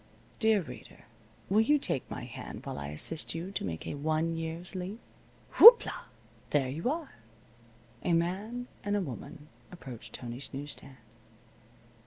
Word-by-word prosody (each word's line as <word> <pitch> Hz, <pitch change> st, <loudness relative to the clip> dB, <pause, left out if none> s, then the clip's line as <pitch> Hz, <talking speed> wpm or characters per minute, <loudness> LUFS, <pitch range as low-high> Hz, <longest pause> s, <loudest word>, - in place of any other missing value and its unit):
Dear 220 Hz, -3 st, +4 dB
Reader, -, -, -12 dB, 0.4 s
will 210 Hz, +3 st, +4 dB
you 295 Hz, +7 st, +4 dB
take 140 Hz, -, -3 dB
my -, -, -6 dB
hand -, -, -8 dB
while -, -, -5 dB
I 70 Hz, -, -5 dB
assist 150 Hz, -, -2 dB
you 170 Hz, +4 st, -5 dB
to -, -, -3 dB
make 80 Hz, -4 st, -4 dB
a -, -, -4 dB
one 155 Hz, +3 st, 0 dB
year's 165 Hz, +2 st, -5 dB
leap. 190 Hz, +4 st, -5 dB, 0.6 s
Whoop 470 Hz, +1 st, +12 dB
la! -, -, -6 dB, 0.4 s
There 135 Hz, -3 st, +1 dB
you 160 Hz, -, -2 dB
are. 310 Hz, 0 st, -3 dB, 0.9 s
A 175 Hz, -, +1 dB
man 200 Hz, +9 st, -1 dB, 0.2 s
and 205 Hz, 0 st, 0 dB
a 205 Hz, -, +1 dB
woman 145 Hz, 0 st, -8 dB, 0.2 s
approached 130 Hz, -10 st, -10 dB
Tony's 120 Hz, +2 st, -7 dB
news 145 Hz, +1 st, -5 dB
stand. 135 Hz, -1 st, -9 dB
165 Hz, 155 wpm, -30 LUFS, 140-205 Hz, 0.9 s, Whoop